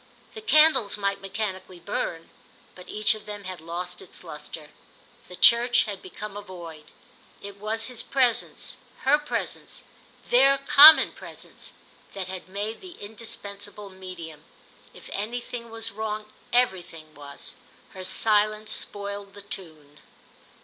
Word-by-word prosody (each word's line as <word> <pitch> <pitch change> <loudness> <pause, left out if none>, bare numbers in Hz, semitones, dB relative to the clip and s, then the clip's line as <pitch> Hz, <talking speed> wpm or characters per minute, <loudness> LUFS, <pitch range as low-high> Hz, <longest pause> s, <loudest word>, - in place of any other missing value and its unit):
The 435 - -8
candles 305 - +4
might 200 -1 -1
mechanically 190 -2 -5
burn, 165 -1 -4 0.4
but 180 - -14
each 215 0 +2
of 215 -1 -10
them 205 -1 -6
had 185 -3 -7
lost 175 +2 -5
its - - -12
lustre. - - -9 0.6
The 180 - -10
church 240 +5 +5
had 205 -4 -6
become 205 +2 -8
a 205 - -5
void; 170 -6 -10 0.5
it 200 0 -10
was 220 +2 -2
his 250 -2 -5
presence, 255 -4 0 0.2
her 290 +3 +4
presence, 295 - -5 0.5
their 275 +3 +6
common 295 +3 +9
presence, - - -12 0.4
that 190 -2 -4
had 185 0 -8
made 205 +3 -4
the 370 -2 -10
indispensable 205 -2 -7
medium. 175 -5 -9 0.5
If - - -14
anything 235 +3 -5
was 225 0 -4
wrong 215 0 -5 0.2
everything 175 -10 0
was—her 145 +5 -11
silence 215 +2 +4
spoiled 200 -1 -4
the 205 - -11
tune. 155 -7 -9
205 Hz, 130 wpm, -26 LUFS, 185-225 Hz, 0.6 s, common